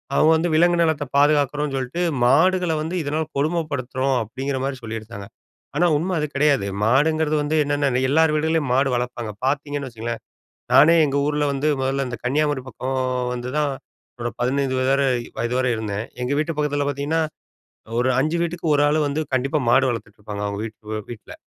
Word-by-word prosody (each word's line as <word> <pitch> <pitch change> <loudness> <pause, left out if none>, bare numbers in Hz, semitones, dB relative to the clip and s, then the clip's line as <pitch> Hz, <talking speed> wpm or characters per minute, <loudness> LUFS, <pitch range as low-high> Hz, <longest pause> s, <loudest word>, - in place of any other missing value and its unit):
அவங்க 155 +3 +5
வந்து 170 +2 0
விலங்கு 175 +2 +4
நலத்த 160 -3 +1
பாதுகாக்கறோனு 145 0 +2
சொல்லிட்டு 130 +6 -3 0.2
மாடுகள 175 +7 +3
வந்து 160 +4 -3
இதனால் 155 +2 -2
கொடுமைப்படுத்துறோம். 140 -4 -1
அப்படிங்கிற 135 +5 -4
மாதிரி 135 -1 -3
சொல்லிருதாங்க! 110 -3 -7 0.5
ஆனா 175 - +4
உண்மை 180 +5 -2
அது 150 - -1
கிடையாது. 140 -7 +3 0.2
மாடுங்கறது 155 +5 +2
வந்து 155 +2 -1
என்னென்ன 145 -3 0
எல்லார் 160 0 +4
வீடுகள்லயும் 155 -3 0
மாடு 135 +1 +3
வளர்ப்பாங்க, 120 -3 -4
பார்த்திங்கன்னு 145 0 -2
வச்சுக்கங்களேன் 115 0 -5 0.5
நானே 165 +3 +7
எங்க 140 0 -1
ஊர்ல 150 0 0
வந்து, 140 +2 -1
மொதல்ல 135 +1 0
இந்த 120 -2 -5
கன்னியாகுமரி 145 +1 +1
பக்கம் 130 +1 -4 0.4
வந்து 125 0 -5
தான் 150 -2 +1 0.5
என்னோட 120 0 -3
15 130 +1 0
வயது 130 +1 +2
வரை 140 0 +2 0.3
வயது 120 +2 -1
வரை 130 -1 +1
இருந்தேன். 110 0 -3 0.2
எங்க 125 - -2
வீட்டு 155 +1 -1
பக்கத்துல 145 -1 0
பார்த்திங்கன்னா, 145 +3 -1 0.8
ஒரு 130 +1 +2
5 155 +4 0
வீட்டுக்கு 170 0 -3
ஒரு 145 - +3
ஆள் 155 +1 +2
வந்து 145 +2 -1
கண்டிப்பா 135 +4 +1
மாடு 130 +2 +4
வளர்த்துட்ருப்பாங்க 105 -2 -6
அவங்க 100 0 -4
வீட் 110 -1 -7
வீட்ல. 115 -3 -9
140 Hz, 165 wpm, -22 LUFS, 125-150 Hz, 0.8 s, நானே